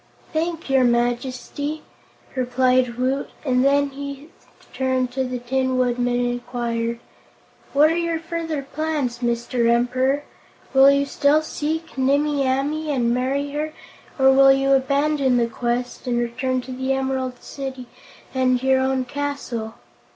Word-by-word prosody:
"Thank 330 +1 -2
your 270 -1 +3
Majesty," 250 +5 -1 0.5
replied 255 -1 +2
Woot, 260 +2 -1 0.2
and 250 -2 +2
then 280 +1 +3
he 280 +2 -7 0.4
turned 260 -1 0
to 265 +1 -1
the 250 0 -3
Tin 260 +1 -1
Woodman 245 -1 +1
and 245 - +1
inquired: 235 -1 -3 0.7
"What 300 +3 +5
are - - 0
your 335 -1 0
further 325 -3 -4
plans, 290 -4 -2
Mr. 235 0 0
Emperor? 255 +4 +2 0.5
Will 270 +1 +8
you 280 0 +3
still 285 +2 +2
seek 310 -1 -4
Nimmie 280 +1 +2
Amee 290 +4 -1
and 240 -5 +1
marry 275 +3 -1
her, 305 +2 -3 0.4
or 265 -1 +6
will 270 0 +7
you 270 0 +2
abandon 275 0 +2
the 235 - +3
quest 240 +2 -3
and 240 -1 +1
return 255 +2 -1
to 255 - -9
the 260 +1 -1
Emerald 265 -1 -2
City 265 -2 -6 0.5
and 255 -1 +1
your 265 0 +4
own 260 0 0
castle?" 250 -5 -4
265 Hz, 140 wpm, -22 LUFS, 250-285 Hz, 0.7 s, Will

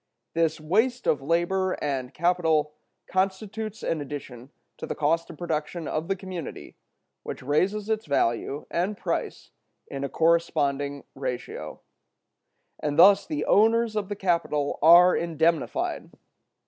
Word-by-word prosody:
This 165 -1 +1
waste 220 +11 +1
of 145 - +2
labor 175 +5 +1
and 135 -3 -3
capital 160 -3 +1 0.3
constitutes 200 +3 -2
an 160 - -1
addition 135 -3 -8 0.3
to - - -6
the - - -3
cost 165 +3 0
of - - -10
production 165 -1 -3
of 155 +2 -2
the 195 - 0
commodity, 185 -4 -8 0.5
which - - -7
raises 190 +10 0
its 220 -4 -2
value 140 +1 0
and 190 +4 -1
price - - -4 0.3
in 140 0 -6
a 140 - -2
corresponding 145 -4 +1
ratio, 125 -1 -6 1.0
and 150 0 -2
thus 195 +3 +7
the 305 -2 -2
owners 225 +1 +3
of 210 -2 -2
the 205 - -3
capital 170 -6 0
are 175 +3 +8
indemnified. 170 - 0
170 Hz, 130 wpm, -26 LUFS, 150-195 Hz, 1.0 s, are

